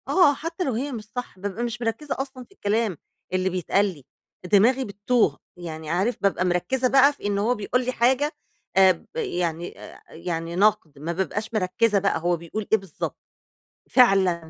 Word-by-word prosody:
آه، 355 -6 +5
حتى 330 +5 -4
لو 265 - -1
هي 270 +6 -2
مش 230 -4 -5
صح، 245 -6 -5
بابقى 205 +4 -4
مش 240 0 -4
مركِّزة 230 +6 -2
أصلًا 265 -1 -5
في - - -24
الكلام 215 - -1 0.4
اللي 185 0 +1
بيتقال 185 +2 +1
لي، 165 -10 -6 0.5
دماغي 245 +6 +4
بتّوه 205 - +1 0.2
يعني 160 -3 -7
عارف، 190 +9 0
بابقى 195 -2 +1
مركِّزة 180 +9 +1
بقى 275 +2 +5
في 285 - -13
إن 205 -1 0
هو 225 +5 +1
بيقول 245 +4 -1
لي 255 - 0
حاجة 260 +5 +2 0.5
آآ، 190 -1 +8
ب 170 - -7
يعني 175 - -3
آآ، - - -12
يعني 165 0 -4
نقد، 195 -7 +2
ما 160 +4 -3
بابقاش 200 +5 -3
مركِّزة 210 +1 +2
بقى 195 -3 +1
هو 175 +1 +1
بيقول 170 +6 -6
إيه 220 - +6
بالضبط، 195 -6 -6 0.7
فعلًا، 190 -9 +4
205 Hz, 180 wpm, -24 LUFS, 180-250 Hz, 0.7 s, آآ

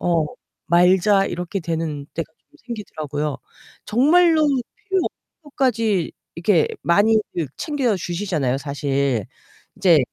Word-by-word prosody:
어 170 -3 +2 0.4
말자.' 185 +3 +4
이렇게 180 +2 -3
되는 160 -3 -3
때가 165 -1 -4 0.2
좀 300 - -22
생기더라고요. 150 - -4 0.5
정말로 315 +7 +4
필요 285 +8 -2
없는 - - 0 0.3
것까지 230 - 0 0.2
이렇게 170 -1 +2
많이들 205 -3 +2
챙겨 270 - 0
주시잖아요, 170 -8 -1
사실. 140 -5 -1 0.5
인제 175 -5 +5
180 Hz, 260 characters per minute, -21 LUFS, 155-230 Hz, 0.5 s, 인제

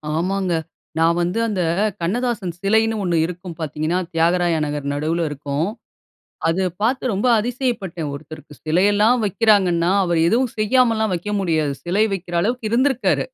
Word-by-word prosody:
ஆமாங்க. 185 +1 0 0.5
நான் 165 +1 +3
வந்து 180 +6 -1
அந்த, 200 -5 -1 0.4
கண்ணதாசன் 205 -2 -1
சிலைன்னு 220 +2 +2
1 175 -2 0
இருக்கும் 175 -1 -7
பார்த்தீங்கன்னா, 155 +3 -1
தியாகராய 170 +1 +2
நகர் 145 -1 -4
நடுவுல 160 +3 -1
இருக்கும். 145 +3 -2 0.8
அத 185 +3 +1
பார்த்து 255 +1 +1
ரொம்ப 205 +6 0
அதிசயப்பட்டேன். 220 - -3
ஒருத்தருக்கு 155 +1 -10
சிலையெல்லாம் 205 +8 +3
வைக்கிறாங்கன்னா, 190 -4 +3
அவரு 175 -2 +1
எதுவும் 245 +1 +1
செய்யாமல்லாம் 220 -2 +2
வைக்க 210 +5 -4
முடியாது. 155 -6 0
சிலை 200 +5 +2
வைக்கிற 175 -2 -5
அளவுக்கு 230 +1 -1
இருந்திருக்காரு. 255 +1 +2
185 Hz, 130 wpm, -21 LUFS, 165-220 Hz, 0.8 s, நான்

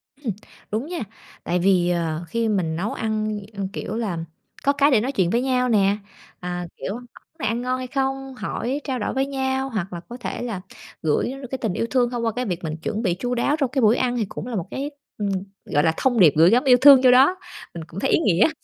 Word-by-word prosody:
Ừm. 265 -7 -4 0.4
Đúng 220 +5 -1
nha, 350 0 -4 0.4
tại 180 - 0
vì, 180 -1 +3
ờ, 165 -2 -1
khi 230 +5 -1
mình 180 -7 0
nấu 190 +6 -2
ăn 215 -1 -2
ăn, 200 -1 -3
kiểu 215 - -4
là, 215 -7 -2 0.5
có 280 - +3
cái 285 +1 +3
để 230 -5 +4
nói 255 +5 -1
chuyện 190 -10 +1
với 235 +5 +1
nhau 250 -1 +1
nè. 200 -2 +3 0.4
À, 180 0 -4
kiểu, 195 - -4
món 245 +2 -8 0.3
này - - -1
ăn 230 +2 -1
ngon 255 +1 -1
hay 255 0 -5
không, 270 0 -2
hỏi, 260 +3 -3
trao 260 -3 -2
đổi - - -2
với 265 0 +1
nhau 265 -1 -1
hoặc 195 -6 -3
là 175 - -4
có 240 - -7
thể 245 - -5
là 225 -6 -4 0.4
gửi 155 -2 +1
nó 270 - -7
được 260 - -7
cái 265 - -2
tình 220 -7 -2
yêu 230 - -1
thương 250 -2 +3
thông 240 -1 -3
qua 225 - +1
cái 250 0 -1
việc 180 -4 -3
mình 155 -1 -3
chuẩn 210 +7 -3
bị 185 -7 +1
chu 245 +6 -2
đáo 265 +5 +1
trong 275 -4 +1
cái 265 - 0
buổi 220 0 +5
ăn 245 -1 0
thì 225 - 0
cũng 225 - -6
là 245 - -4
một 185 -3 -3
cái, 280 +2 -3 0.3
ừm, 205 -1 -1 0.4
gọi 145 - +1
là, 160 - +3
thông 245 -3 +2
điệp 160 -7 +7
gửi 165 +3 +7
gắm 245 +5 +4
yêu 255 -3 +6
thương 275 -1 +9
vô 255 - +7
đó. 265 +8 +6 0.4
Mình 170 - -6
cũng 170 - -7
thấy 265 - 0
ý - - +4
nghĩa. 205 - +4
230 Hz, 260 wpm, -23 LUFS, 190-260 Hz, 0.5 s, thương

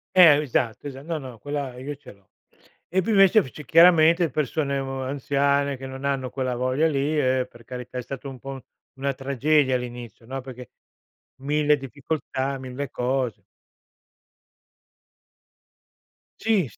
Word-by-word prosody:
Eh, 160 -5 +8
esatto, 130 -2 -1
esa 135 0 -9
no, 165 0 -3
no, 125 -5 -10
quella 145 -3 -4
io 140 +3 -5
ce 145 - -14
l'ho. 100 -2 -23 0.6
E 190 +2 +2
poi 225 - -1
invece 195 +1 +6
c'è 140 +3 -10
chiaramente 165 +1 +6
persone, 140 0 -1
uhm, 135 0 -3
anziane 140 +1 0
che 135 +1 -7
non 130 +1 -8
hanno 135 -2 -1
quella 130 -2 -2
voglia 130 +5 +1
lì 145 +1 0
e, 130 -2 +1
per 120 - -16
carità, 125 +1 -7
è 125 - -1
stato 135 +2 -7
un 130 - -9
po' 135 +1 -8 0.4
una 140 +1 -1
tragedia 135 +1 +2
all'inizio, 120 -2 -6
no, 135 +3 -5
perché 125 -1 -10 0.7
1000 150 +2 +2
difficoltà, 135 0 -3
1000 130 +1 -5
cose. 125 -3 -2 3.0
Sì, 210 -7 +2
s 110 - -18
135 Hz, 145 wpm, -24 LUFS, 130-150 Hz, 3.0 s, Eh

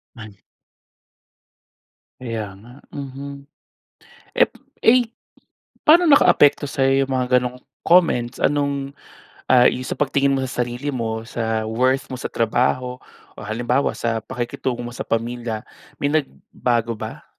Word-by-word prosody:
Mali. 110 -3 -11 1.8
Kaya 115 -5 -4
nga. 120 +4 -15 0.2
Mhm. 140 0 -8 0.8
Eh - - +4 0.3
eh, 245 +2 +5 0.8
paano 335 +2 +6
nakaapekto 145 - +5
sa'yo 135 -1 +2
yung 135 - -3
mga 125 0 +3
gano'ng 125 0 -5 0.2
comments? 150 -9 +3
Anong, 140 -1 0 0.6
ah, 125 -1 +6
yung 125 - +3
sa - - -3
pagtingin 140 -1 +1
mo 135 - -1
sa 125 -1 -4
sarili 125 +4 -3
mo, 115 -3 -3
sa 110 -1 -2
worth 130 +5 0
mo 130 - -5
sa - - -3
trabaho, 125 +2 0 0.3
o - - -13
halimbawa 120 +5 -1
sa 115 -1 -1
pakikitungo 120 +1 -4
mo 120 - -6
sa - - -7
pamilya, 115 -1 -2 0.3
may 145 +1 -1
nagbago 120 -5 -1
ba? 110 - -7
125 Hz, 130 wpm, -21 LUFS, 115-140 Hz, 1.8 s, paano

